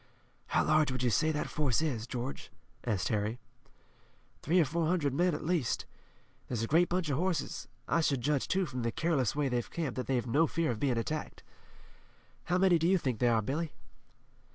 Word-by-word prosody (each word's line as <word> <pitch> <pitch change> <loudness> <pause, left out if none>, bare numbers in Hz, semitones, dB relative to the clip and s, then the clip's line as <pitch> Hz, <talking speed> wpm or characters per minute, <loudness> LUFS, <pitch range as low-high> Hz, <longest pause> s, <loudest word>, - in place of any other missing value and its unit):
"How - - +2
large 155 -2 +3
would 130 -1 -2
you 120 - +2
say 155 +7 +2
that 150 - -2
force 140 -6 +1
is, 125 -8 -2
George?" 125 +2 -5 0.4
asked 105 -7 0
Harry. 105 +1 -1 1.0
"Three 175 +5 +3
or 165 - +5
four 160 +3 -1
hundred 160 -6 +1
men 175 +2 +2
at 150 - -6
least. 160 -8 0 0.6
There's 115 -3 -2
a - - -1
great 170 +6 +4
bunch 175 -4 0
of 140 - 0
horses. 180 -4 -1 0.2
I 165 - +2
should 140 -5 +1
judge, 145 +1 0
too, 190 0 +1
from 130 -5 -5
the 115 0 -1
careless 140 -5 0
way 145 -1 +1
they've 120 -2 -1
camped, 155 -7 -3
that 130 - -3
they've 125 -3 0
no 145 +7 +3
fear 165 -3 0
of 110 - -4
being 130 -2 +1
attacked. 150 +7 -4 1.0
How 180 - +1
many 185 -2 +4
do 165 - +2
you 190 +1 +4
think 130 -9 -2
they 125 - +3
are, 115 -2 +3
Billy?" 150 +7 -2
145 Hz, 200 wpm, -31 LUFS, 125-165 Hz, 1.0 s, or